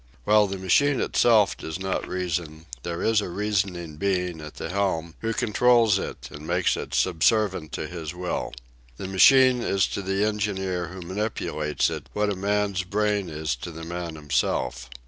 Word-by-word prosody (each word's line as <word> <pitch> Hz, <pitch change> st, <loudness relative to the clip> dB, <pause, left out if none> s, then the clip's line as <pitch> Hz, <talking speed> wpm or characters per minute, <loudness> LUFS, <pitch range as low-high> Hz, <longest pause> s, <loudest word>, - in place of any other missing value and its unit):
While 105 Hz, 0 st, +4 dB
the 95 Hz, 0 st, -4 dB
machine 130 Hz, +10 st, +3 dB
itself 110 Hz, -4 st, +3 dB
does 80 Hz, +1 st, -6 dB
not 95 Hz, 0 st, -2 dB
reason, 85 Hz, -3 st, -3 dB, 0.2 s
there 85 Hz, +2 st, -4 dB
is 110 Hz, -1 st, +3 dB
a 100 Hz, -, -5 dB
reasoning 95 Hz, -5 st, -2 dB
being 90 Hz, -3 st, -1 dB
at 75 Hz, -1 st, -9 dB
the 80 Hz, -, -5 dB
helm, 90 Hz, -4 st, -1 dB
who 115 Hz, -, -2 dB
controls 115 Hz, -2 st, +3 dB
it -, -, -6 dB
and 75 Hz, +2 st, -9 dB
makes 90 Hz, +1 st, +2 dB
it -, -, -5 dB
subservient 95 Hz, -1 st, +2 dB
to -, -, -3 dB
his 85 Hz, -3 st, -6 dB
will. 90 Hz, 0 st, -3 dB, 0.5 s
The 95 Hz, -, -5 dB
machine 130 Hz, +6 st, +6 dB
is 95 Hz, -4 st, +2 dB
to -, -, -3 dB
the 95 Hz, +2 st, 0 dB
engineer 95 Hz, -4 st, -1 dB
who 90 Hz, +1 st, -8 dB
manipulates 90 Hz, -5 st, -1 dB
it -, -, -6 dB
what 105 Hz, 0 st, +1 dB
a -, -, -2 dB
man's 100 Hz, 0 st, 0 dB
brain 105 Hz, 0 st, 0 dB
is 75 Hz, -4 st, -2 dB
to 75 Hz, -, -7 dB
the 80 Hz, 0 st, -9 dB
man 85 Hz, -1 st, -5 dB
himself. 65 Hz, -4 st, -1 dB
95 Hz, 170 wpm, -25 LUFS, 85-105 Hz, 0.5 s, machine